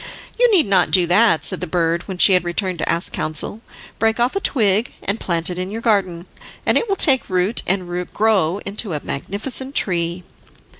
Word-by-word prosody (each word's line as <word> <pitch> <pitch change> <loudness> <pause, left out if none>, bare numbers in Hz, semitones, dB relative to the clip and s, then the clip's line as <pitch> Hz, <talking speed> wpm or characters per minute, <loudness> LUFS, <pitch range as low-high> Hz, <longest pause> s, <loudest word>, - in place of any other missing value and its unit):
"You - - +5
need 370 -7 +5
not 190 -3 +2
do 180 -2 +5
that," 180 0 +3
said - - -3
the - - -4
bird, 170 0 -1
when 190 -2 -6
she 190 - +6
had 180 -2 +3
returned 175 0 -3
to - - -2
ask 170 - 0
counsel. 155 +7 -2 0.4
"Break 225 +1 +1
off 245 +6 +1
a - - +1
twig, 220 - +1
and 200 +3 -2
plant 170 -1 +1
it 180 - -5
in 185 +1 -4
your 225 +3 -6
garden, 185 -6 0 0.4
and - - +2
it 465 - 0
will 395 - +1
take 270 -8 +2
root, 185 +5 0
and 185 -1 -1 0.2
grow 200 -5 +1
into 200 -1 -2
a 150 - -4
magnificent 260 - -3
tree." 175 -1 -1
190 Hz, 200 wpm, -19 LUFS, 175-225 Hz, 0.4 s, she